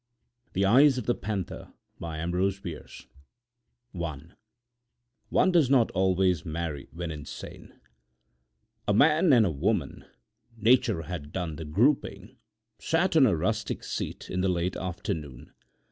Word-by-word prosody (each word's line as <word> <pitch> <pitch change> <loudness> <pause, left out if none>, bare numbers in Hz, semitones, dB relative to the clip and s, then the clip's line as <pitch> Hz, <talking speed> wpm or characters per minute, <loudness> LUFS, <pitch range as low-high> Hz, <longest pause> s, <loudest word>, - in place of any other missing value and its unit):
THE 95 +1 +1
EYES 130 +6 +6
OF 125 - -3
THE 120 - +2
PANTHER 100 -5 -5 0.3
I 80 -1 -4 1.7
ONE 80 -3 -6 1.0
DOES 170 -8 +3
NOT 130 -4 +4
ALWAYS 95 -3 +2
MARRY 80 -3 -4
WHEN 85 0 -5
INSANE 75 -2 -10 1.1
A 105 - +3
man 155 - +5
and 120 -4 +6
a 90 - 0
woman—nature 115 - -1
had 80 -5 -7
done 85 -4 -4
the 80 - -6
grouping—sat 110 - -1
on 140 -5 +7
a 100 - +2
rustic 80 - -2
seat, - - -5
in 90 - -1
the 95 - +1
late 90 0 -1
afternoon. 80 -7 -5
95 Hz, 115 wpm, -27 LUFS, 85-120 Hz, 1.7 s, on